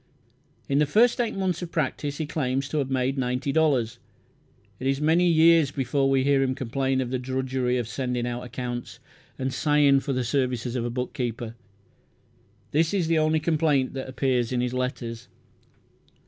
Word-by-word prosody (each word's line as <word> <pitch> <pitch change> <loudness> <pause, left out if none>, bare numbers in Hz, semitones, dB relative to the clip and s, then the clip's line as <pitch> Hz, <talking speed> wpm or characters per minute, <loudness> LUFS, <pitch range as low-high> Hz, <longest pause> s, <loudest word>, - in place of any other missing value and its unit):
In 140 +1 +2
the 150 - +3
first 235 - +4
eight 230 - -2
months 185 -3 -1
of 175 -1 -6
practice 145 -1 -2
he 155 - -2
claims 135 -3 -1
to 155 - -1
have 135 -2 -1
made 135 +1 0
ninety 125 +2 -1
dollars. 135 -8 +1 0.8
It 130 - -2
is 135 0 +1
many 165 +4 +3
years 165 -2 +5
before 135 0 0
we 135 -1 +3
hear 140 0 +3
him 130 -1 0
complain 130 +2 -1
of 125 -1 -4
the 130 - -1
drudgery 130 -1 -1
of 120 -3 -2
sending 125 +1 -2
out 120 0 -3
accounts, 125 0 -6 0.4
and 130 0 -2
sighing 145 0 +4
for 140 - -4
the 130 -1 0
services 125 -1 -1
of 120 -2 -1
a - - -1
bookkeeper. 120 -1 -4 1.2
This 160 +5 +2
is 185 -4 +1
the 165 -1 +3
only 155 0 +2
complaint 150 -4 +1
that 135 -1 -5
appears 130 -3 0
in 125 - 0
his 125 0 -1
letters. 125 -2 -4
135 Hz, 175 wpm, -25 LUFS, 125-150 Hz, 1.2 s, years